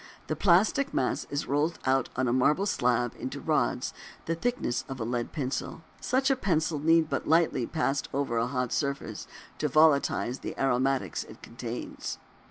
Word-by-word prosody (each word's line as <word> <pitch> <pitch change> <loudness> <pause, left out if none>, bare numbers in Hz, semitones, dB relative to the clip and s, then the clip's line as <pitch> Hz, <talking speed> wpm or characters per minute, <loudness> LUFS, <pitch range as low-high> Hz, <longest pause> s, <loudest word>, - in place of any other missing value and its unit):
The - - -2
plastic 205 +10 +3
mass 130 - 0
is 145 +1 -2
rolled 145 +4 0
out 130 -1 +2
on 130 0 +1
a 120 - +2
marble 150 +9 +3
slab 125 - +1
into - - -5
rods - - 0 0.3
the 165 - 0
thickness 165 - -1
of 135 -1 -5
a - - -1
lead 120 +1 -2
pencil. 140 +2 -3 0.2
Such 260 +2 +1
a - - +4
pencil 165 - 0
need 165 +3 +5
be 160 - -4
but - - -3
lightly 160 -7 +3
passed 140 -3 -1
over 135 -4 0
a 115 - +1
hot 125 -2 -2
surface 140 -7 -3 0.3
to 150 - +1
volatilize 140 -4 +3
the - - -6
aromatics 130 -6 +1
it - - -14
contains. - - -6
140 Hz, 175 wpm, -28 LUFS, 125-165 Hz, 0.3 s, need